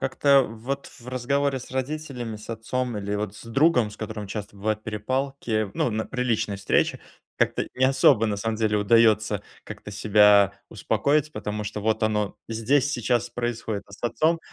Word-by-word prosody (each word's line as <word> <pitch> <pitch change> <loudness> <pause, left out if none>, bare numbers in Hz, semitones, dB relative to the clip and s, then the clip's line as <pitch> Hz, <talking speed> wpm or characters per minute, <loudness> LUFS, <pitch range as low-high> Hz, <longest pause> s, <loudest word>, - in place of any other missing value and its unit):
Как-то 140 +1 +4
вот, 120 +5 -5
в 120 - -15
разговоре 135 +2 0
с - - -11
родителями, 130 -4 -4
с 105 - -10
отцом, 120 +1 -3
или 100 0 -3
вот 105 0 -3
с - - -12
другом, 125 -1 +3
с 105 - -12
которым 110 -1 -6
часто 105 0 -6
бывают 110 +2 -2
перепалки, 110 0 -2
ну, - - +1
на 110 0 -2
при 125 -1 -3
личной 110 -4 0
встрече, 100 - +1 0.4
как-то - - +1
не 130 - +2
особо, 130 -3 +4
на 105 -2 -1
самом 110 +2 -2
деле, 110 -1 +1
удаётся 110 -1 +3 0.2
как-то 105 -1 -9
себя 105 -1 +5 0.2
успокоить, 150 +1 0
потому 105 -5 -4
что, 105 +1 -4
вот 110 +1 0
оно 105 -2 0
здесь, 125 +5 +1
сейчас 120 -2 0
происходит. 115 -3 -3
А 100 - -18
с 100 - -13
отцом, 155 +8 +1
115 Hz, 175 wpm, -25 LUFS, 105-130 Hz, 0.4 s, себя